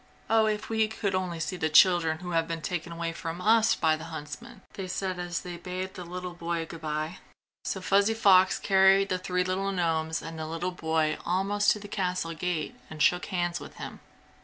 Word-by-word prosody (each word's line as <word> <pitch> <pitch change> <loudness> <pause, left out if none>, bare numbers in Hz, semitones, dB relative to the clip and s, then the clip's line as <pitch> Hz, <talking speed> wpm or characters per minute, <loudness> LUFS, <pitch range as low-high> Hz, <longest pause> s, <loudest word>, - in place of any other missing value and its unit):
"Oh, 220 -1 +5
if 210 0 -1
we 220 -1 +2
could 215 -2 -2
only 180 -3 -2
see 180 +3 -3
the 160 -3 0
children 165 0 +5
who 180 +1 -7
have 165 -1 +1
been 165 -1 -4
taken 175 -2 -3
away 165 0 -3
from 165 0 -5
us 220 +3 +4
by 160 -1 +2
the 155 +1 -8
huntsmen!" 150 -3 -8
they 190 -2 -5
said 185 0 -3
as 175 0 -3
they 175 -1 -7
bade 185 +2 -5
the 180 - -7
little 180 +1 -6
boy 170 -1 -3
goodbye. 155 0 -4 0.5
So 190 - -2
Fuzzy 200 +3 +3
Fox 190 -4 +5
carried 195 0 +4
the 185 -1 0
three 180 0 0
little 190 +2 -1
gnomes 160 -3 0
and 165 0 -7
the 155 - -4
little 165 +3 -3
boy 160 -3 0
almost 195 +4 +1
to 210 - -7
the 205 - -9
castle 180 -4 -2
gate 165 -1 -2 0.2
and 155 - -9
shook 180 +4 +3
hands 175 -3 -1
with - - -11
him. - - -8
180 Hz, 205 wpm, -28 LUFS, 165-190 Hz, 0.5 s, Oh